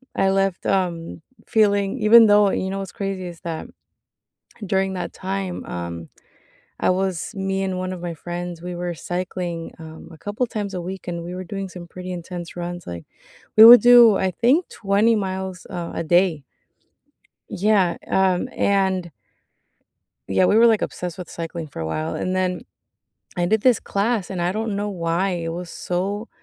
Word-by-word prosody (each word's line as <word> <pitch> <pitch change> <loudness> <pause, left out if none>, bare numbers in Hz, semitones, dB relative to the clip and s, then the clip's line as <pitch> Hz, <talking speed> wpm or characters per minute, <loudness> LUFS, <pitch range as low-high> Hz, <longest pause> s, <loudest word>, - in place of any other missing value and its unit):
I 195 - +2
left, 195 -1 0
um, 170 -4 -1 0.3
feeling 205 +1 +2
even 225 +1 +7
though 205 -1 +5
you 190 - -2
know 195 +1 -3
what's 195 -2 -6
crazy? 195 -2 -4
Is 170 -1 -10
that 165 -2 -5 1.0
during 190 0 0
that 180 - -5
time, 190 -1 -4
um, 85 -2 -6 0.7
I - - +3
was 185 -2 -1
me 195 -1 -2
and 190 -1 -2
one 185 0 -3
of 185 - -6
my 175 -1 -3
friends, 175 +1 -6
we 180 +1 -6
were 175 0 -3
cycling, 175 -1 -4
um, 160 0 -11
a 160 - -13
couple 205 +7 -2
times 205 -4 -4
a 180 - -3
week, 185 +2 -7
and 170 -1 -4
we 175 +1 -6
were 185 0 -6
doing 195 +1 -5
some 180 -1 -10
pretty 185 +1 -8
intense 175 0 -7
runs. 175 0 -5
Like, 85 -1 -7 0.5
we 215 - +10
would 240 +2 +11
do, 240 -3 +8
I 190 -1 +1
think, 260 - +2
20 210 +3 +2
miles, 190 -2 -4
uh, 175 -2 -5
a - - -2
day. 175 -2 +2 1.1
Yeah, 195 -3 +2
um, 190 -2 +2
and 190 -3 +1 1.2
Yeah, 95 - +3
we 205 - +4
were, 235 +1 +7
like, 220 -2 +3
obsessed 175 -2 -4
with 180 - -8
cycling 165 -1 -6
for 140 - -10
a 80 - -3
while, 155 - -3
and 185 0 -2
then 185 -1 -1 0.8
I 175 -1 +1
did 220 +3 +1
this 250 -4 +4
class, 205 0 -1
and 180 -3 -3
I 175 +1 0
don't 215 0 -2
know 205 +1 -2
why, 175 +1 -1
it 170 -2 -3
was 175 0 -6
so 200 +5 -3
185 Hz, 180 wpm, -22 LUFS, 175-200 Hz, 1.2 s, would